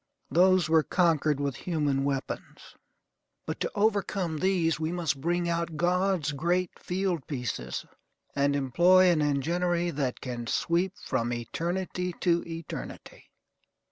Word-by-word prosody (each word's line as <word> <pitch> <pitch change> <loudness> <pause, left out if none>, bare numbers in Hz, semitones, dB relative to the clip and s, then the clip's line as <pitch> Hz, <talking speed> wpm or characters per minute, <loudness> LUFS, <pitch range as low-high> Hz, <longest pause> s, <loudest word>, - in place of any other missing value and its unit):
Those 185 +1 +4
were 160 0 +5
conquered 155 -4 +2
with 140 -2 -1
human 150 -6 0
weapons; 140 -1 -4 0.7
but - - -4
to - - -2
overcome 200 -6 0
these 175 -4 +1
we 160 +1 -1
must 160 -6 -1
bring 175 +2 0
out 170 -1 -2
God's 180 -2 +1
great 175 +5 0
fieldpieces, 145 - -3 0.5
and 140 0 +2
employ 175 +7 +5
an 160 -3 +2
enginery 170 +5 0
that 135 -4 -2
can 120 -2 -5
sweep 175 +8 0
from 120 +1 -1
eternity 175 +9 -3
to 170 -2 +2
eternity. 165 -1 -8
170 Hz, 120 wpm, -28 LUFS, 140-180 Hz, 0.7 s, were